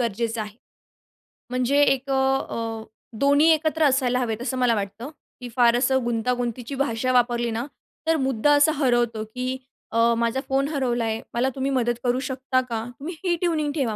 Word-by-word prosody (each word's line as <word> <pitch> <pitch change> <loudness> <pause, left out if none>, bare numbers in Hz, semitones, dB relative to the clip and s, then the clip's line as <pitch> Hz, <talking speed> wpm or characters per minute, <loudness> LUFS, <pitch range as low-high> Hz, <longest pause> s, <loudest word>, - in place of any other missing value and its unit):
गरजेचं 230 0 -1
आहे. 210 +1 -7 0.9
म्हणजे 255 +3 +2
एक 270 0 +1
अ, - - +1 0.4
अ, 225 -1 -4 0.4
दोन्ही 285 +3 +4
एकत्र 315 0 +1
असायला 260 -3 +2
हवेत, 230 -2 -2
असं 255 +1 -2
मला 245 -2 +3
वाटतं, 210 +6 -5 0.3
की 245 - -6
फार 240 -1 +5
असं 265 0 +2
गुंतागुंतीची 240 +2 -2
भाषा 255 -2 0
वापरली 240 -1 +2
ना, 230 +3 -2 0.4
तर 325 - +4
मुद्दा 265 0 +1
असा 290 +2 +5
हरवतो, 240 -4 +1
की 255 +4 -4 0.3
अ, 230 - 0 0.2
"माझा 235 +2 0
फोन 275 +1 +1
हरवला 255 -6 -1
आहे, 220 0 -2
मला 250 +3 +1
तुम्ही 270 +1 -1
मदत 240 -2 +1
करू 250 +1 +1
शकता 260 0 0
का?" 225 -1 -2 0.2
तुम्ही 325 +4 -6
ही 345 -1 +2
ट्यूनिंग 310 -4 0
ठेवा, 245 -8 -1
250 Hz, 170 wpm, -24 LUFS, 235-275 Hz, 0.9 s, फार